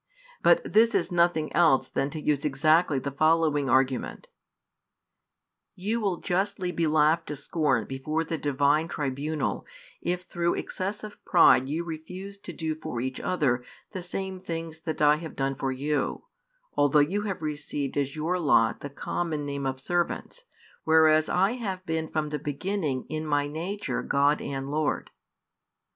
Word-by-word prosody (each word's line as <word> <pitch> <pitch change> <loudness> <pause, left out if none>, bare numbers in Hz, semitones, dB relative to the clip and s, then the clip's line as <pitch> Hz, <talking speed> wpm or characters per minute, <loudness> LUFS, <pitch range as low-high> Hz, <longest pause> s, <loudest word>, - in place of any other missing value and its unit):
But - - +3
this 230 +2 +5
is - - +1
nothing 170 -3 +2
else 165 -6 +4
than 135 +1 -1
to 155 - -6
use 150 -2 0
exactly 155 +2 +3
the 140 +1 -3
following 155 -1 +2
argument: 130 +1 0 1.5
"You 215 +5 -2
will 195 -4 0
justly 185 0 -1
be 170 -2 0
laughed 155 +2 +3
to 150 - -4
scorn 140 -4 0
before 155 +5 -2
the 165 -1 -4
Divine 145 +2 +2
tribunal 145 0 -2 0.4
if 180 +1 -2
through 170 -1 -1
excess 200 +3 -4
of 210 -1 -10
pride 135 -7 +5
you 160 +4 -1
refuse 180 +5 -7
to 185 - -8
do 160 -1 -3
for 155 -5 -5
each 130 +1 -3
other 130 -9 0 0.3
the 185 - -5
same 190 +1 -4
|185 - - -23
things 165 -1 -5
that 160 -2 -3
I 150 0 +6
have 160 0 -8
done 135 0 0
for 135 0 -2
you, 140 +2 -1 0.5
although 145 +1 +3
you 165 +8 +3
have 185 -4 -4
received 145 -2 -3
as 140 0 -1
your 165 +4 -1
lot 115 -8 +3
the 145 - -6
common 155 +2 -3
name 140 -1 -3
of 130 0 -3
servants, 175 - -2 0.4
whereas 155 -1 +5
I 190 +3 +3
have 195 -7 -4
been 160 -2 -2
from 155 -1 -1
the 150 0 -3
beginning 150 -1 -2
in 155 0 -3
My 145 -2 +1
nature 175 +8 -3
God 145 +2 +2
and 135 0 -4
Lord." 155 0 -1
155 Hz, 160 wpm, -27 LUFS, 145-175 Hz, 1.5 s, I